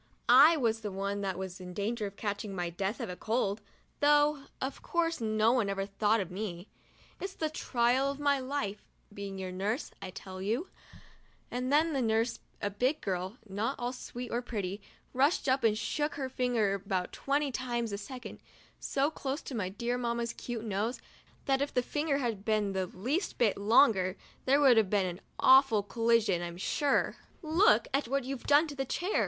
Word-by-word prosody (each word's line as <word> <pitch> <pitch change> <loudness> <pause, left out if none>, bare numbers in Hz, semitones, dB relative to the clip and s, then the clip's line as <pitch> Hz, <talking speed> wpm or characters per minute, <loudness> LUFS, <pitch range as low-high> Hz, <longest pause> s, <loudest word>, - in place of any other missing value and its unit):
I 315 +4 +8
was 225 -5 +1
the 210 -2 -5
one 200 +1 -2
that 190 -2 -2
was 190 0 -6
in 180 -1 -8
danger 210 +2 -1
of 200 - -10
catching 205 -1 -4
my 175 -2 -2
death 195 +7 -2
of 185 -8 -5
cold, 220 -2 0 0.4
though 295 -1 +4
of 265 +1 -4
course 335 -4 0
no 215 0 +3
one 235 -5 +2
ever 195 0 -1
thought 210 +2 +1
of 190 -3 -4
me. 185 -1 -5 0.3
" - - -27
It's 385 0 -5
the 315 -1 -2
trial 255 -1 +1
of 280 0 -5
my 285 -1 +2
life, 255 -6 -3 0.3
being 200 -1 -6
your 185 -1 -4
nurse, 205 +9 -2
I - - -5
tell 185 0 -8
you," 230 - -1 0.8
and 250 +2 -2
then 310 +2 +3
the 270 - 0
nurse, 225 +1 +1 0.2
a 205 - 0
big 255 +9 0
girl 190 +3 -3
not 210 +6 -1
at - - -7
all 245 +1 -1
sweet 245 -1 -7
or 240 - 0
pretty, 205 -5 -4 0.3
rushed 275 +6 +2
up 265 +1 +2
and 215 -2 +3
shook 295 +6 -1
her 270 -2 -3
finger 245 -6 +1
about 190 -2 -2
twenty 280 0 0
times 240 -3 -2
a 200 - -2
second 250 +4 -8 0.4
so 280 +3 0
close 280 -1 -4
to - - -7
my 205 -6 -2
dear 235 +5 -2
Mamma's 235 -1 -1
cute 235 -2 -5
nose 215 +4 -1 0.5
that 270 -1 +2
if 280 - -1
the 250 - +3
finger 295 +1 0
had 230 -7 -2
been 215 -2 +1
the 190 -1 -1
least 260 - -2
bit 225 -4 +3
longer, 200 -3 +4 0.3
there 275 +2 +4
would 265 -5 +6
have 215 -4 +4
been 200 -2 +2
an 180 +1 -5 0.2
awful 260 -5 +6
collision, 225 -4 +2
I'm 175 0 -5
sure. 280 +9 +1 0.3
"Look 330 +7 +4 0.2
what 275 +2 0
you've 265 0 -6
done 290 +3 +6
to 295 -3 -7
the 270 - -1
chair!' 355 +9 -1
230 Hz, 195 wpm, -31 LUFS, 200-270 Hz, 0.8 s, I